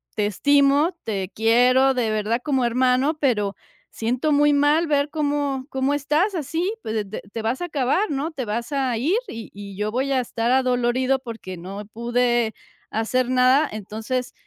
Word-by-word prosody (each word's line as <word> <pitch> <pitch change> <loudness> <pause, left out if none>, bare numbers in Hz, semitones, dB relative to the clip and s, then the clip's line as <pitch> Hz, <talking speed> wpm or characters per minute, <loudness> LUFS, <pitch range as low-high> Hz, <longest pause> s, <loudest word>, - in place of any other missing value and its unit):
te 210 - +1
estimo, 285 - +3
te 195 -4 -3
quiero, 250 +4 +4
de 245 -4 0
verdad, 215 +2 -1
como 265 -4 +1
hermano, 255 +5 +2
pero 210 -8 +1 0.3
siento 250 +7 -1
muy 295 +1 +4
mal 290 +3 +3
ver 285 -1 +1
cómo 290 -3 -1
cómo 265 +1 0
estás 300 +8 +1
así, 330 +6 -2
pues, 215 -2 -3
te 215 - -6
te 215 +3 -7
vas 230 +6 -2
a - - -1
acabar, 300 +5 0
¿no?, 290 +4 -2
te 275 -5 -4
vas 235 +5 -3
a 265 -3 0
ir 310 - +1
y 225 -2 -7
y 200 -1 -9
yo 210 +1 -2
voy 265 +4 -1
a 260 - +2
estar 235 0 -2
adolorido 255 0 +2
porque 225 -7 -8
no 195 +4 -7
pude 240 +1 0 0.4
hacer 245 +3 0
nada, 255 +4 +4
entonces, 220 +4 -4
255 Hz, 170 wpm, -23 LUFS, 225-285 Hz, 0.4 s, quiero